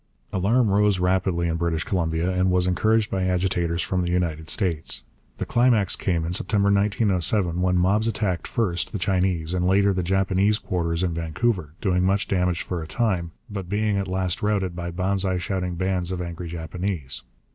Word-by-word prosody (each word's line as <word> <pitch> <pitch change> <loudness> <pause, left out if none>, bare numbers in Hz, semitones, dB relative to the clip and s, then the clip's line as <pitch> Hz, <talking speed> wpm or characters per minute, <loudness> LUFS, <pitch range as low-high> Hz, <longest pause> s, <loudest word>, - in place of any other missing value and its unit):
Alarm 105 +4 +2
rose 105 -1 +3
rapidly 90 -1 +1
in 85 0 -1
British 85 -1 -1
Columbia, 85 -1 0
and 90 0 +1
was 90 0 +2
encouraged 110 +4 +2
by 95 - 0
agitators 90 -2 0
from 90 +1 -1
the 90 - -1
United 85 -3 -1
States. 80 - -1 0.3
The - - -3
climax 120 -6 +3
came 85 -4 -1
in 85 - -3
September 100 +1 +2
1907, 100 -3 +1
when 90 0 +2
mobs 100 +5 +2
attacked 100 -6 -1
first 95 -7 -1
the - - -1
Chinese 90 -3 0
and 90 0 +1
later 100 +1 +4
the 95 - 0
Japanese 95 +3 +2
quarters 85 -4 -2
in 90 -2 0
Vancouver, 85 +1 -1
doing 90 -2 +1
much 95 +1 +1
damage 90 -2 0
for 90 -2 -4
a 80 - -6
time, 95 -4 0 0.2
but 100 -5 -6
being 105 +1 +1
at 100 -1 -2
last 95 -1 -1
routed 100 -4 0
by 85 0 -4
Banzai 95 +1 0
shouting 90 0 -2
bands 95 0 -1
of 90 - -3
angry 85 0 -5
Japanese. 85 -3 -4
90 Hz, 180 wpm, -24 LUFS, 85-100 Hz, 0.3 s, later